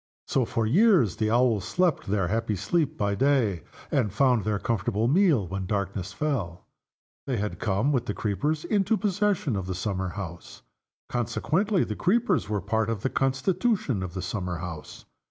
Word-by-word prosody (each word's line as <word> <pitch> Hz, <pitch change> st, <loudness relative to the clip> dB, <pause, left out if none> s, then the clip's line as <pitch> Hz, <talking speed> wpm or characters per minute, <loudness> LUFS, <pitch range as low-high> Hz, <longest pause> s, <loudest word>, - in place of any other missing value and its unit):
So, 130 Hz, -3 st, +1 dB
for 115 Hz, 0 st, -1 dB
years, 170 Hz, -, +4 dB
the 110 Hz, -1 st, +1 dB
Owls 115 Hz, -3 st, +3 dB
slept 180 Hz, -, 0 dB
their 95 Hz, -2 st, +1 dB
happy 110 Hz, 0 st, 0 dB
sleep 135 Hz, -, 0 dB
by 100 Hz, -1 st, 0 dB
day, 125 Hz, -, +2 dB, 0.3 s
and 120 Hz, -8 st, +1 dB
found 125 Hz, 0 st, +3 dB
their 105 Hz, -1 st, 0 dB
comfortable 110 Hz, +1 st, 0 dB
meal 150 Hz, -, +3 dB
when 95 Hz, +1 st, -4 dB
darkness 100 Hz, -2 st, -2 dB
fell. 105 Hz, -, -3 dB, 0.6 s
They 130 Hz, -3 st, 0 dB
had 105 Hz, 0 st, -3 dB
come, 105 Hz, +7 st, +1 dB
with 125 Hz, -4 st, 0 dB
the 105 Hz, -, -2 dB
creepers, 145 Hz, +9 st, -1 dB
into 210 Hz, +1 st, +2 dB
possession 205 Hz, -, 0 dB
of 95 Hz, -2 st, -3 dB
the 95 Hz, -, -3 dB
summer 95 Hz, 0 st, -2 dB
house. 85 Hz, -3 st, -8 dB, 0.4 s
Consequently, 160 Hz, -, 0 dB
the 105 Hz, -, -4 dB
creepers 190 Hz, -, +1 dB
were 105 Hz, -, 0 dB
a -, -, -3 dB
part 110 Hz, +2 st, 0 dB
of 110 Hz, -3 st, -3 dB
the 130 Hz, -, 0 dB
constitution 135 Hz, -, 0 dB
of 95 Hz, -1 st, -6 dB
the 95 Hz, -, -3 dB
summer 90 Hz, -2 st, -3 dB
house. 85 Hz, -3 st, -8 dB
110 Hz, 175 wpm, -26 LUFS, 100-145 Hz, 0.6 s, years